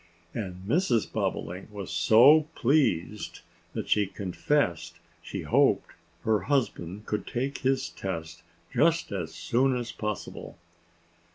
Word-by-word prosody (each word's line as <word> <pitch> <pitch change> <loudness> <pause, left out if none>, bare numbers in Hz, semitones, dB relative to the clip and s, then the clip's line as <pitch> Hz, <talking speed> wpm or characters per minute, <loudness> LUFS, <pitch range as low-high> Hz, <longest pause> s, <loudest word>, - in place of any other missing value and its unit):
And 95 -4 -5
Mrs. 125 - +2
Bobolink 90 +5 -3
was 100 -3 -6
so 125 - +6
pleased 115 - +1 0.3
that - - -4
she 105 -2 +3
confessed 90 - -1 0.3
she - - -6
hoped - - +3 0.3
her 110 -1 +3
husband 105 - -1
could 105 - -3
take 135 +3 -2
his 135 0 +1
test 85 -3 -5 0.3
just 160 +4 +2
as 90 -5 -3
soon 130 +2 +1
as 120 -1 -4
possible. 105 -2 -5
105 Hz, 115 wpm, -28 LUFS, 90-135 Hz, 0.3 s, so